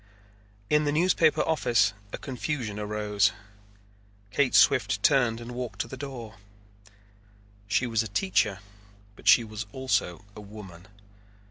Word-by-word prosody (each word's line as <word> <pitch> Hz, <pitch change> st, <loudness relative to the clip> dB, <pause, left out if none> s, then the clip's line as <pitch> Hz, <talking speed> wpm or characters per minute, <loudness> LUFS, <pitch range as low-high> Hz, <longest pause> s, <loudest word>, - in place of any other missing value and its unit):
In 150 Hz, +4 st, +2 dB
the 145 Hz, -, +1 dB
newspaper 165 Hz, 0 st, +3 dB
office 115 Hz, -10 st, +2 dB, 0.2 s
a -, -, -5 dB
confusion 125 Hz, -5 st, -4 dB
arose. 105 Hz, -1 st, +1 dB, 1.0 s
Kate 140 Hz, +2 st, +1 dB
Swift 105 Hz, -7 st, +4 dB
turned 120 Hz, -4 st, +3 dB
and 120 Hz, +1 st, -8 dB
walked 120 Hz, -4 st, -5 dB
to -, -, -4 dB
the 130 Hz, -, -8 dB
door. 125 Hz, -5 st, -8 dB, 1.3 s
She 120 Hz, -, +1 dB
was 115 Hz, -2 st, +1 dB
a 110 Hz, -, -4 dB
teacher 105 Hz, -, 0 dB, 0.5 s
but -, -, -13 dB
she 120 Hz, -, +7 dB
was 110 Hz, -1 st, -7 dB
also 110 Hz, -7 st, -1 dB
a 105 Hz, -, -9 dB
woman. 100 Hz, -4 st, -12 dB
115 Hz, 130 wpm, -27 LUFS, 105-130 Hz, 1.3 s, she